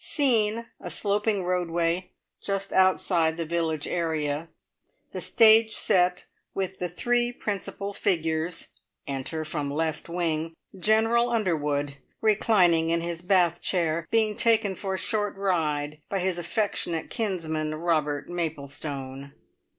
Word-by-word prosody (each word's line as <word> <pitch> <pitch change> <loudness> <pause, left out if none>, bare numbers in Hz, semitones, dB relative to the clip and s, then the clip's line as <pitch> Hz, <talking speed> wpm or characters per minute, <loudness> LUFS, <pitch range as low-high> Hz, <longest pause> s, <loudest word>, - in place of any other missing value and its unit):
Scene, 230 -6 +3
a 180 - -7
sloping 205 +3 0
roadway 175 0 0 0.3
just 195 -1 -3
outside 180 -3 +3
the 165 - -2
village 160 -2 -1
area. 160 -2 -2 0.6
The - - -4
stage 220 0 +5
set 180 -3 +2 0.3
with 190 -1 -3
the 180 - -2
three 240 +7 +1
principal 200 -3 -4
figures. 165 -2 -1 0.4
Enter 140 +4 -4
from 150 -2 -3
left 160 +3 -2
wing, 165 -2 -2 0.2
General 225 +4 +3
Underwood, 150 -10 -1 0.2
reclining 190 -7 +3
in 170 0 +1
his 170 0 -4
bath 175 -2 +2
chair, 165 -3 0
being 220 -2 +2
taken 220 -3 +3
for 190 0 -3
a - - -3
short 205 0 -1
ride 155 -6 -1
by 200 - -1
his 185 -1 -1
affectionate 175 -3 -2
kinsman, 160 -7 -2
Robert 155 -3 0
Maplestone. 140 -4 -5
175 Hz, 120 wpm, -26 LUFS, 160-200 Hz, 0.6 s, stage